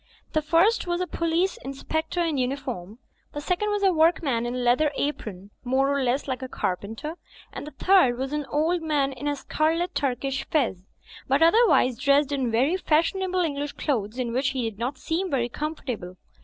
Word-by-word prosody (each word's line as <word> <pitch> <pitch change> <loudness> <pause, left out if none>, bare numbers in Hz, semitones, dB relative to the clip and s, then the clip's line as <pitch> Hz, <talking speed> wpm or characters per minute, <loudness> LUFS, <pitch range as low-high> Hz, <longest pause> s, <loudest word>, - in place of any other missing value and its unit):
The 310 - +2
first 340 +8 +3
was 345 0 0
a 365 - 0
police 335 +2 0
inspector 315 +5 -3
in 315 -5 0
uniform; 250 -7 -3 0.4
the 290 - -4
second 360 +7 -1
was 415 -1 -1
a 385 -2 +4
workman 310 -7 +2
in 245 - -3
a - - -2
leather 250 +5 +2
apron, 205 -10 -4
more 270 +2 +2
or 280 - 0
less 260 +3 0
like 260 -1 -3
a 260 - -4
carpenter, 225 - -4 0.4
and - - -6
the 300 - -10
third 365 -11 +4
was 265 +2 -3
an 295 -2 -2
old 325 +5 +1
man 295 -4 +1
in 265 +3 -5
a 290 - +1
scarlet 330 +5 0
Turkish 275 -1 -1
fez, 220 - 0 0.4
but 275 +4 +3
otherwise 330 - +4
dressed 280 0 +3
in 265 -4 0
very 260 +10 +2
fashionable 370 +3 +1
English 290 -3 -2
clothes 230 -5 -2
in 245 -2 -2
which 260 +2 +1
he 260 -4 -1
did 215 -2 -7
not 255 +4 -2
seem 340 +7 -2
very 245 -5 0
comfortable. 245 - -5
285 Hz, 185 wpm, -25 LUFS, 250-325 Hz, 0.4 s, a